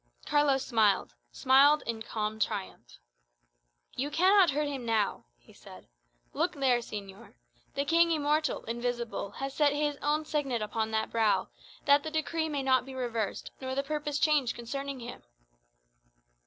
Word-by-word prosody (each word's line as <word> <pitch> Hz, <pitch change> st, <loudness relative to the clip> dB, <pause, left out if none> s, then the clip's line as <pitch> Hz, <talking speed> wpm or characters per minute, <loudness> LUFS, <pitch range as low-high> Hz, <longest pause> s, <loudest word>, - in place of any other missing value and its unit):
Carlos 290 Hz, -2 st, +2 dB
smiled 215 Hz, -, +2 dB, 0.2 s
smiled 280 Hz, +3 st, +5 dB
in 225 Hz, -1 st, -3 dB
calm 215 Hz, -1 st, -3 dB
triumph. 185 Hz, -, -4 dB, 1.0 s
"You 280 Hz, +3 st, -2 dB
cannot 370 Hz, +3 st, +5 dB
hurt 295 Hz, +1 st, 0 dB
him 275 Hz, -3 st, -4 dB
now," 220 Hz, -, 0 dB
he -, -, -21 dB
said. -, -, -14 dB, 0.5 s
"Look -, -, 0 dB
there, 260 Hz, -3 st, +2 dB
señor. 200 Hz, -4 st, -9 dB, 0.4 s
The 280 Hz, -, -1 dB
King 335 Hz, +3 st, +4 dB
immortal, 305 Hz, -1 st, 0 dB
invisible, 235 Hz, -2 st, -3 dB
has 270 Hz, +3 st, -5 dB
set 290 Hz, -1 st, +3 dB
his 295 Hz, 0 st, -1 dB
own 300 Hz, +1 st, 0 dB
signet 275 Hz, -7 st, -1 dB
upon 220 Hz, +1 st, -2 dB
that 220 Hz, 0 st, -1 dB
brow, 225 Hz, -2 st, +1 dB, 0.4 s
that 285 Hz, -1 st, +5 dB
the 315 Hz, -, -5 dB
decree 315 Hz, +1 st, -1 dB
may 285 Hz, -2 st, -2 dB
not 260 Hz, -1 st, +3 dB
be 265 Hz, 0 st, -10 dB
reversed 230 Hz, -5 st, -3 dB
nor 260 Hz, 0 st, -4 dB
the 275 Hz, -, 0 dB
purpose 295 Hz, 0 st, -3 dB
changed 295 Hz, -5 st, +2 dB
concerning 275 Hz, +2 st, -5 dB
him." 235 Hz, -, -8 dB
270 Hz, 150 wpm, -29 LUFS, 230-295 Hz, 1.0 s, smiled